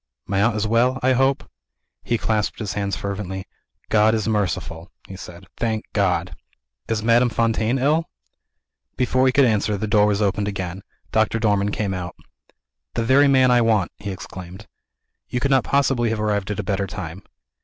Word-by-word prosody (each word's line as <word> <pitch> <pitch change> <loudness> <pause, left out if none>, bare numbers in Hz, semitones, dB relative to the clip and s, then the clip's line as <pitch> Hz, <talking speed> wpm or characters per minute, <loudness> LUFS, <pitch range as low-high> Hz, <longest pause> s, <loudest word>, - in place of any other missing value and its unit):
"My 95 0 0
aunt 110 +1 +2
is 105 0 -1
well, 120 +4 +2
I 130 +1 +4
hope?" 135 +3 +1 0.5
He 120 - -1
clasped 110 -2 -1
his 105 -4 -4
hands 100 -2 -2
fervently. 95 -1 -5 0.4
"God 110 +1 +4
is 110 -2 -2
merciful," 90 -5 -2 0.2
he 95 - -9
said. 90 0 -11
"Thank 110 -2 -1
God!" 90 -3 0 0.5
"Is 110 -1 -1
Madame 120 +2 +4
Fontaine 115 +2 +1
ill?" 150 +5 +1 0.9
Before 130 +1 +2
he - - +4
could 140 +1 +4
answer, 105 -2 +1
the 110 - -2
door 105 -1 +3
was 105 -1 +1
opened 100 0 0
again. 95 -2 -4 0.3
Doctor 110 0 +2
Dormann 105 -3 +1
came 100 -2 -2
out. 90 -2 -5 0.8
"The 115 - 0
very 135 +5 +5
man 130 -2 +4
I 120 -1 +5
want!" 110 -5 +2
he 100 - -6
exclaimed. 95 +1 -8 0.6
"You 125 - -1
could 140 +2 0
not 130 -2 +4
possibly 135 -4 +1
have 110 -1 -2
arrived 105 -2 -1
at 105 - -3
a - - -2
better 100 +1 -1
time." 95 -1 -7
105 Hz, 175 wpm, -22 LUFS, 100-120 Hz, 0.9 s, very